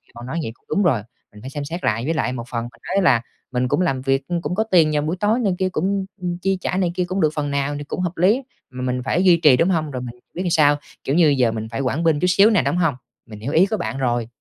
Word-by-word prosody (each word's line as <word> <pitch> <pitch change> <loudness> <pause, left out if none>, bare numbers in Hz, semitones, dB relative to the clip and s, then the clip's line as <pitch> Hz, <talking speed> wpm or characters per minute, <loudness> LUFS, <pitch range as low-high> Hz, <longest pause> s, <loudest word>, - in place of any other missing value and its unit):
cậu 120 - -9
nói 135 +7 -4
vậy 110 - -4
cũng - - -38
đúng 205 - +1
rồi, 135 - +2 0.3
mình 105 - -14
phải 130 - -7
xem 145 +1 -5
xét 170 +5 -6
lại, 115 +3 0
với 160 - 0
lại 140 -5 -1
một 120 -2 -5
phần 115 -2 -2
mình 120 0 -11
nói 195 - +3
là 125 -9 +4 0.3
mình 125 0 0
cũng 150 - +1
làm 135 -8 0
việc, 135 +1 0
ưm, 175 -1 -2
cũng 180 - -3
có 220 - +2
tiền 175 -8 +3
vào 150 - +2
buổi 160 +5 -2
tối 215 +4 +2
này 200 -7 +1
kia 185 0 +1
cũng, 185 - -2
ưm, 195 0 0 0.2
ưm, 175 -1 -2
chi 195 +2 0
trả 185 - -1
này 180 -3 +1
kia 180 - 0
cũng 185 +2 -2
được 155 - +4
phần 145 -2 -2
nào 140 +1 -1
thì 145 - -5
cũng 145 - -5
hợp 180 -1 -3
lý, 185 +5 +5 0.4
ừm, 130 - -12
mà - - -4
mình 125 0 -2
phải 170 +8 +1
duy 180 -3 +6
trì, 150 -6 +5
đúng 165 +7 +2
hông? 160 -5 0
Rồi 130 -2 -4
mình 120 -1 -7 0.2
biết 180 - -3
sao, 145 -3 +4 0.3
kiểu 135 - -1
như, 170 -2 +5
giờ 120 -3 +3
mình 110 0 -5
phải 120 - -3
quản 135 +5 -1
binh 160 -3 +3
chút 180 - +1
xíu 195 +4 +5
nè, 210 -5 +3
đúng - - 0
hông? 165 -6 +1 0.3
Mình 105 -3 -11
hiểu 120 +7 -4
ý 165 +4 +5
của 215 +2 -2
bạn 175 -7 -4
rồi. 120 -3 0
155 Hz, 315 wpm, -21 LUFS, 130-180 Hz, 0.4 s, duy